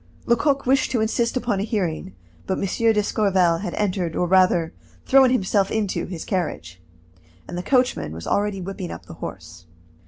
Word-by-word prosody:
Lecoq 275 +4 +2
wished 260 +1 +2
to 245 - 0
insist 235 +3 0
upon 235 -6 -1
a - - 0
hearing, 175 - -3 0.3
but 190 - 0
M. - - -1 0.3
d'Escorval 195 -5 +2
had 205 - -4
entered, 185 -5 -1
or 180 - +1
rather 175 -2 +3 0.3
thrown 265 -1 +6
himself 200 -4 +1
into, 215 -3 -1
his 175 -3 -6
carriage, 90 - -3 0.7
and 175 - -7
the 175 - -2
coachman 250 - +1
was 80 +1 -8
already 200 -1 0
whipping 185 -1 -5
up - - -8
the - - -10
horse. 90 - -8
195 Hz, 165 wpm, -23 LUFS, 175-225 Hz, 0.7 s, thrown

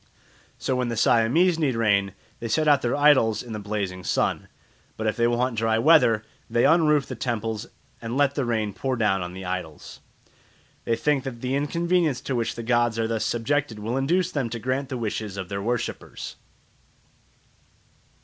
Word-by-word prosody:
So 130 - -1
when 125 -1 0
the 115 -1 -3
Siamese 155 - +3
need 140 -6 +1
rain, 100 -4 +2 0.3
they 115 - -4
set 155 +7 +1
out 145 -2 +5
their 120 - 0
idols 135 -7 +4
in 120 -2 -8
the 105 - -4
blazing 100 -3 -4
sun; - - 0 0.5
but 110 - -4
if 110 - +1
they 115 -1 +2
want 120 -1 0
dry 110 0 +2
weather, 115 -5 +5 0.3
they 120 - +2
unroof 150 -3 +4
the - - -6
temples 115 -2 -3 0.3
and 115 +2 -4
let 140 -1 +3
the 140 - -1
rain 110 -4 -1
pour 130 +4 -2
down 105 -5 +1
on 90 0 -5
the 95 0 -8
idols. 90 -4 -6 0.9
They 115 - +1
think 140 +3 +1
that 120 -4 -7
the 130 +1 -2
inconvenience 165 +1 +1
to 135 - -3
which 115 -2 -1
the 115 - -6
gods 120 -1 +1
are 115 -1 0
thus 110 -1 -1
subjected 120 +1 -1
will 110 +4 -3
induce 175 +7 +1
them 135 -6 -2
to 115 - -4
grant 130 +3 -2
the 130 - -3
wishes 105 -3 -4
of 95 -2 -5
their 100 0 -3
worshippers. 120 +2 -4
120 Hz, 185 wpm, -25 LUFS, 110-135 Hz, 0.9 s, out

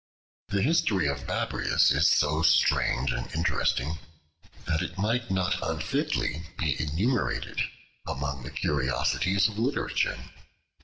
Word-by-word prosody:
The 100 -1 0
history 135 - +2
of 70 -2 -3
Babrias - - +2
is - - +4
so 80 +2 +2
strange 80 -4 +3
and - - -4
interesting, 80 -2 0 0.7
that 80 -1 0
it 85 +1 -5
might 115 +4 0
not 95 -2 0
unfitly 80 +2 -2
be 75 -6 0
enumerated 95 - -1 0.5
among 70 0 -3
the 65 - -7
curiosities 75 - +1
of 105 -1 -6
literature. 130 +5 0
80 Hz, 115 wpm, -27 LUFS, 70-100 Hz, 0.7 s, is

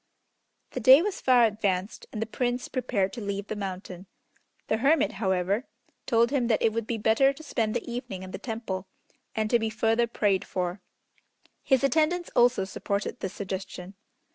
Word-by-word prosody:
The - - -4
day 260 +6 +8
was 410 -1 -3
far 250 -2 +5
advanced, 200 -3 -2
and 215 - -5
the 220 - -1
Prince 245 +2 -2
prepared 220 -7 -1
to 235 - -6
leave 200 -1 -3
the 215 - -5
mountain. 190 -2 -6 0.6
The 215 - +1
Hermit, 275 -2 +3
however, 190 +4 0 0.4
told 235 0 +3
him 260 -4 +1
that 225 - +2
it 220 - +3
would 230 -1 -2
be 235 - -1
better 225 +6 +4
to 285 +3 -12
spend 225 -8 -1
the - - -3
evening 235 -6 -5
in 185 - -8
the - - -6
Temple, 220 -5 -4 0.5
and 220 -1 0
to 240 - +5
be 225 0 -1
further 225 +2 +1
prayed 205 -4 +1
for. 180 +1 -3 0.8
His 265 -1 +2
attendants 315 +6 +1
also 240 -4 +4
supported 200 +1 -3
this 190 - -4
suggestion. 190 -1 -6
220 Hz, 175 wpm, -27 LUFS, 195-245 Hz, 0.8 s, day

